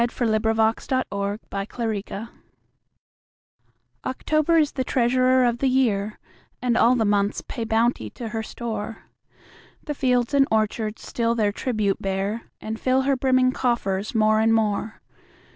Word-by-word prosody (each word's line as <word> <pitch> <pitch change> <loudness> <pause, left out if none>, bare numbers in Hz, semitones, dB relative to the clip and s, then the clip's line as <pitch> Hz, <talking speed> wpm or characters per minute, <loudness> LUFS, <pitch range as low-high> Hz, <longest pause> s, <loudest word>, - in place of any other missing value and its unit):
Paul 240 0 0
Laurence 220 +1 +1
Dunbar 200 -6 -1 0.2
October 210 +1 -4 1.8
OCTOBER 310 +5 +1
is 300 -2 +3
the 260 - -2
treasurer 255 +1 +3
of 240 -1 0
the 270 - +2
year, 215 -6 +1 0.4
And 245 -2 0
all 240 +2 +5
the 225 -3 +1
months 205 0 +1
pay 230 - -4
bounty 225 +2 +1
to 235 -3 -7
her 225 0 -3
store: 220 -1 -5 0.8
The 295 - -3
fields 250 -2 +1
and 275 -1 +4
orchards 215 0 -1
still 230 -1 -1
their 210 -3 +1
tribute 215 -3 -1
bear, 195 +4 -2
And 220 +1 -5
fill 260 +1 +2
her 275 0 +2
brimming 255 -1 +3
coffers 215 -5 -1
more 215 0 +4
and 225 +1 +3
more. 215 0 -1
230 Hz, 140 wpm, -24 LUFS, 215-255 Hz, 1.8 s, all